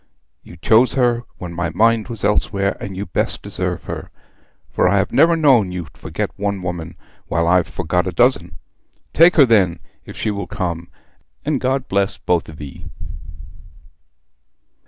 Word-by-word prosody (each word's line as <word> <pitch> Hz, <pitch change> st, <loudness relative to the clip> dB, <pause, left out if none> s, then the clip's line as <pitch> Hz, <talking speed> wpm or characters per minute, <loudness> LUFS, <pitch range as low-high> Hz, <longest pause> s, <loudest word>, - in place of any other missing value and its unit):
You -, -, -14 dB
chose 115 Hz, +3 st, +4 dB
her 120 Hz, -2 st, +1 dB
when 90 Hz, -2 st, -7 dB
my 85 Hz, 0 st, -2 dB
mind 115 Hz, 0 st, +2 dB
was 115 Hz, -4 st, -4 dB
elsewhere, 100 Hz, -1 st, +1 dB
and 95 Hz, -2 st, -7 dB
you 100 Hz, -, -3 dB
best 85 Hz, -, -2 dB
deserve -, -, -3 dB
her; -, -, -6 dB, 0.6 s
for -, -, +2 dB
I 100 Hz, -, +2 dB
have 95 Hz, -, 0 dB
never 165 Hz, +4 st, +4 dB
known 130 Hz, -, +4 dB
you 90 Hz, -2 st, -5 dB
forget -, -, -4 dB
one 100 Hz, -2 st, -2 dB
woman, 85 Hz, -2 st, -5 dB, 0.3 s
while 85 Hz, 0 st, 0 dB
I've 90 Hz, 0 st, +3 dB
forgot 90 Hz, +1 st, -1 dB
a -, -, -1 dB
dozen. 90 Hz, -4 st, +1 dB, 0.6 s
Take 170 Hz, +2 st, +6 dB
her 145 Hz, -, +7 dB
then, 95 Hz, -8 st, +3 dB, 0.2 s
if -, -, -11 dB
she 110 Hz, -, -1 dB
will 100 Hz, -1 st, -4 dB
come, 85 Hz, -2 st, -4 dB, 0.6 s
and 145 Hz, -3 st, 0 dB
God 130 Hz, 0 st, -1 dB
bless 100 Hz, 0 st, 0 dB
both 85 Hz, -3 st, -1 dB
of 80 Hz, -, -12 dB
ye.' 70 Hz, -3 st, -9 dB
100 Hz, 160 wpm, -19 LUFS, 85-120 Hz, 0.6 s, her